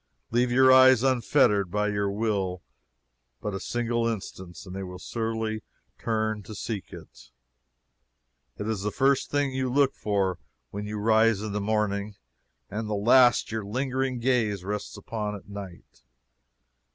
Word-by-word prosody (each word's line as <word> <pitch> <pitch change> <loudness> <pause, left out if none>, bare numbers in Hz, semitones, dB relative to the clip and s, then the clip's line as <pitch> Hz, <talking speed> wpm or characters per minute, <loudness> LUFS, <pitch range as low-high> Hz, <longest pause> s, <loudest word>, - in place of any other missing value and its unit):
Leave 120 +1 +2
your 130 +1 +6
eyes 130 -2 +7
unfettered 120 -6 +3
by 105 +3 0
your 100 -1 0
will 100 -4 -1 0.8
but 105 - -4
a 95 - -3
single 120 0 -1
instant 95 -5 -6
and 90 0 -8
they 95 - -4
will 90 -1 -7
surely 110 +1 -3 0.4
turn 110 -2 -1
to 105 +2 -10
seek 100 -1 -5
it. - - -13 1.3
It 105 - -4
is 110 -3 -2
the 105 - -1
first 135 +4 +1
thing 145 -1 0
you 130 -1 -1
look 140 0 +3
for 100 -3 -1 0.3
when 105 +1 -5
you 105 0 -4
rise 110 0 +3
in 110 - -4
the 105 +1 -2
morning, 105 -1 -1 0.5
and 110 +2 -4
the 105 - 0
last 120 +3 +5
your 110 -1 -3
lingering 130 +4 -2
gaze 115 -6 0
rests 105 +1 -4
upon 105 0 -4
at 100 - -11
night. 100 -8 -10
110 Hz, 150 wpm, -27 LUFS, 100-120 Hz, 1.3 s, eyes